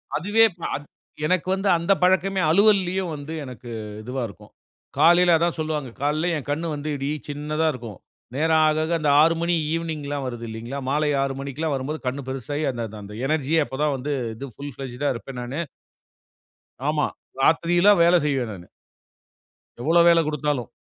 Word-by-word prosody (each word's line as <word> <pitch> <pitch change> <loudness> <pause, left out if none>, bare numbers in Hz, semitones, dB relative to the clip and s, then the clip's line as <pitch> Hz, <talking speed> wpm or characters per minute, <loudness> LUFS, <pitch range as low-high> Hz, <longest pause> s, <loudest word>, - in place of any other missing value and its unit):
அதுவே 205 +8 +4 0.3
அத் 145 - -7 0.4
எனக்கு 180 +2 +1
வந்து 195 +1 -1
அந்த 170 +3 -1
பழக்கமே 190 +1 +3
அலுவல்லயும் 190 -1 +3
வந்து 145 +2 -7
எனக்கு 125 -2 -9 0.3
இதுவா 125 +4 -4
இருக்கும். 105 +1 -15 0.5
காலையில 175 0 +6
அதான் 170 +1 0
சொல்வாங்க, 155 -4 -2
காலையில 155 +4 +1
என் 145 - -8
கண் 160 +3 -2
வந்து 145 +1 -5
இடி 135 +1 -3 0.2
சின்னதா 150 +2 -1
இருக்கும். 115 -6 -9 0.4
நேரம் 160 +2 +3
ஆக 155 - +2
ஆக 160 - -3
அந்த 150 - +1
6:00 165 +2 +4
மணி 170 +1 +1 0.2
ஈவ்னிங்லாம் 150 -4 -3
வருதுல்லீங்கலா, 120 +2 -6
மாலை 150 +2 +1
6:00 135 0 -1
மணிக்குலாம் 140 +3 -3
வரும்போது 140 +4 -4
கண் 135 +2 -2
பெருசாயி, 140 +3 -3
அந்த 120 -2 -4 0.2
அந்த 100 +1 -10
எனர்ஜி 155 0 0
அப்போதான் 145 +3 -1
வந்து 135 +3 -4 0.2
இது 140 +3 -7
புல் 140 0 -7
பிளெட்ஜ்ட்டா 135 +1 -3
இருப்பேன் 125 +1 -7
நானு. 125 +5 -4 1.3
ஆமா. 150 0 +1 0.3
ராத்திரிலாம் 175 +6 +4
வேலை 175 +1 +5
செய்வேன் 135 -6 0
நானு. 90 -3 -10 1.1
எவ்வளோ 165 +7 +4
வேலை 170 -1 +6
குடுத்தாலும் 150 -5 -1
150 Hz, 155 wpm, -24 LUFS, 135-165 Hz, 1.3 s, காலையில